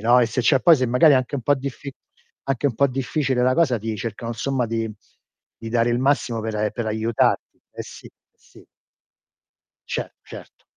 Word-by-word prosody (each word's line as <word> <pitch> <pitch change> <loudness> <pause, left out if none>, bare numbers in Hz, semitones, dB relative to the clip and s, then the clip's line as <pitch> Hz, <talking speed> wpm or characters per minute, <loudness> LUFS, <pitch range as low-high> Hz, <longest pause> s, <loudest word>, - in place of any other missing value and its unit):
no, 120 +3 +4
e - - +4
se 120 +3 -2
c'è 135 +2 +4
poi 170 +2 +7
se 130 -2 0
magari 125 +6 +5
è - - +5
anche 130 +1 -2
un 130 - -5
po' 145 - +3
diffi 140 +1 -7 0.5
anche 135 0 -3
un 135 - -1
po' 140 - +3
difficile 130 0 -1
la 130 +1 +3
cosa 150 -6 +2
ti 110 +1 -4
cercano, 115 +2 -5
insomma, 125 +2 -1
di 115 0 -2 0.7
di 115 - -7
dare 120 0 +2
il 120 - +1
massimo 130 -3 0
per 110 0 -4
a 105 0 0
per 120 +1 -4
aiutarti. 110 +1 0
Eh, - - -6
sì. - - -12
Eh, - - -13 0.3
sì. - - -20 1.2
Ce - - -1 0.2
certo. - - -12
125 Hz, 200 wpm, -22 LUFS, 115-135 Hz, 1.2 s, poi